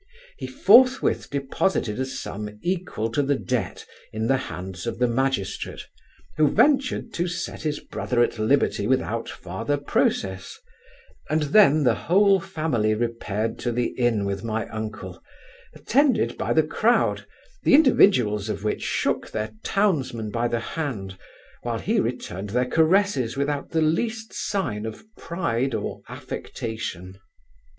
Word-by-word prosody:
He - - -4
forthwith 260 -2 +4
deposited 140 - -1
a 130 - -1
sum 105 -4 -6
equal 175 - -2
to 130 - +1
the 140 0 +1
debt 120 -8 -3 0.3
in 110 +1 -2
the 135 +3 +3
hands 95 +3 -7
of 115 - -3
the 125 +1 +2
magistrate, 130 -4 -2 0.5
who 155 -1 +5
ventured 265 - +2
to 175 +1 -1
set 175 - -4
his 150 -1 -2
brother 120 -1 0
at 120 - -2
liberty 125 +6 +2
without 115 -3 0
farther 95 +11 -3
process; 95 -8 -1 0.7
and 155 0 +1
then 155 -8 +6
the 120 -3 +4
whole 195 - +3
family 125 -11 0
repaired 115 -1 -2
to 120 - -1
the 120 +1 0
inn 120 -5 +1
with 100 +1 -3
my 110 0 -2
uncle, 105 -5 -6 0.5
attended 275 +2 +2
by - - -2
the - - +4
crowd, - - +1 0.3
the - - +5
individuals 125 - +4
of 105 - -4
which 105 - -1
shook - - -1
their 110 0 -3
townsman 135 - 0
by 115 +2 0
the 120 - -1
hand, 115 - -4 0.5
while - - -2
he - - 0
returned 95 +3 -3
their 125 +4 +1
caresses 160 - +2
without 140 0 -1
the 160 -1 +1
least 220 +8 -1
sign 110 - -2
of 110 - -8
pride 135 -7 -2
or - - -4
affectation. 95 -5 -6
125 Hz, 140 wpm, -24 LUFS, 110-160 Hz, 0.7 s, then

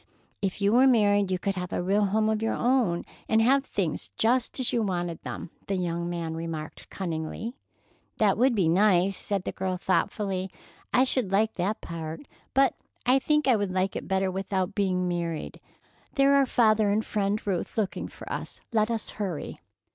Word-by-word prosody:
"If 195 0 -2
you 200 +2 +4
were 255 +3 +6
married, 205 -5 +4
you 185 - +1
could 195 +2 -1
have 180 0 -4
a - - -1
real 200 +3 +2
home 215 +2 +1
of 220 0 0
your 225 - 0
own, 240 -9 +1 0.2
and 220 - +4
have 265 +4 +4
things 185 - -3
just 245 +4 +1
as 255 - +2
you 235 - +2
wanted 175 -5 -2
them," - - -6 0.2
the 195 - 0
young 170 -1 -2
man 170 -2 -3
remarked 160 -1 -6
cunningly. 170 +5 -4 0.6
"That 205 -3 +3
would 250 +1 +3
be 190 -6 +2
nice," 190 +1 +4
said 195 -1 -2
the - - -3
girl 185 -1 -2
thoughtfully. 190 0 -1 0.4
"I 255 - +5
should 255 -6 -1
like 215 +3 +2
that 195 +5 -2
part, 165 - -6 0.3
but 270 0 +4 0.3
I 255 +2 +5
think 300 +1 +1
I 255 - +6
would 205 -3 -1
like 185 +1 0
it - - -5
better 190 0 +1
without 190 0 -2
being 185 -3 0
married. 170 -2 -3 0.6
There 275 -1 +5
are 275 -1 +4
father 215 -4 +3
and 215 +2 +1
Friend 205 0 0
Ruth 190 0 -2
looking 205 -4 -1
for - - -12
us. - - -5
Let 215 0 +3
us 230 -2 -2
hurry." 190 -8 -4
200 Hz, 185 wpm, -27 LUFS, 180-220 Hz, 0.6 s, were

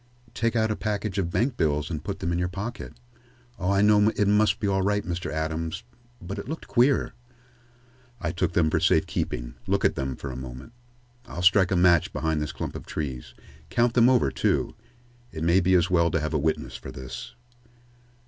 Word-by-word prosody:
"Take 115 +1 0
out 110 -1 +2
a - - 0
package 105 -2 -2
of 90 -3 -1
bankbills 80 - 0
and 75 -2 -4
put 100 0 -5
them 85 -2 -1
into 85 - 0
your 90 - 0
pocket. 100 +7 -6 0.7
Oh, 90 - -1
I 100 0 +3
know 105 0 +5
it 105 - +2
must 105 +2 +3
be 105 - -1
all 95 -1 +1
right, 105 +1 +1
Mr. 85 -1 -3
Adams. 80 +4 -3 0.4
But 100 +1 -6
it 100 - -7
looked 160 - -5
queer." 130 +2 +2 1.1
"I 85 - -2
took 90 0 -1
them 80 -2 +2
for - - +2
safe - - +3
keeping. - - -3
Look - - +1
at - - +4
them 65 -1 -3
for 70 - -6
a - - -7
moment. 65 - -9 0.5
I'll 85 - -5
strike 95 0 +5
a - - +1
match 85 -2 +4
behind 80 -1 -1
this 75 - -3
clump - - -5
of - - -8
trees. 65 -5 -5 0.3
Count 120 0 +2
them 120 0 +5
over, 125 -2 +3
too. - - 0 0.6
It 80 -4 -5
may 85 +3 +4
be 95 +1 +3
as 90 +1 +2
well 85 -2 +4
to 85 - 0
have 75 +1 -3
a 75 - +2
witness 70 -4 -1
for - - -8
this." 65 -1 -8
90 Hz, 205 wpm, -26 LUFS, 80-105 Hz, 1.1 s, know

